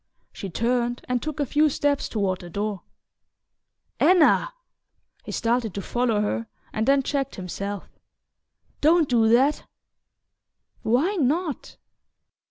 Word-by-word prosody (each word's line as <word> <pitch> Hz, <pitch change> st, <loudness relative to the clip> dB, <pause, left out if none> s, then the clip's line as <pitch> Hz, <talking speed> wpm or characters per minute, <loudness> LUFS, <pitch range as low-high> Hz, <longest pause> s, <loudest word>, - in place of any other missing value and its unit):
She 195 Hz, -, -6 dB
turned 240 Hz, +4 st, -1 dB
and 250 Hz, -1 st, 0 dB
took 310 Hz, -1 st, -5 dB
a 290 Hz, -, +1 dB
few 300 Hz, +4 st, +3 dB
steps 285 Hz, 0 st, 0 dB
toward 195 Hz, -4 st, -1 dB
the 175 Hz, -, -9 dB
door. 205 Hz, +1 st, -3 dB, 1.2 s
"Anna!" 365 Hz, +7 st, +4 dB, 0.7 s
He -, -, -6 dB
started 230 Hz, -3 st, 0 dB
to 200 Hz, -, -3 dB
follow 240 Hz, -4 st, 0 dB
her, 115 Hz, -, -2 dB, 0.3 s
and 220 Hz, +1 st, -1 dB
then 275 Hz, 0 st, +4 dB
checked 275 Hz, -1 st, -2 dB
himself. 195 Hz, +2 st, -5 dB, 0.9 s
"Don't 320 Hz, +1 st, +4 dB
do 230 Hz, -3 st, +3 dB
that!" 265 Hz, +6 st, +3 dB, 1.2 s
"Why 300 Hz, -, +1 dB
not?" 310 Hz, +1 st, -1 dB
245 Hz, 120 wpm, -24 LUFS, 210-290 Hz, 1.2 s, Anna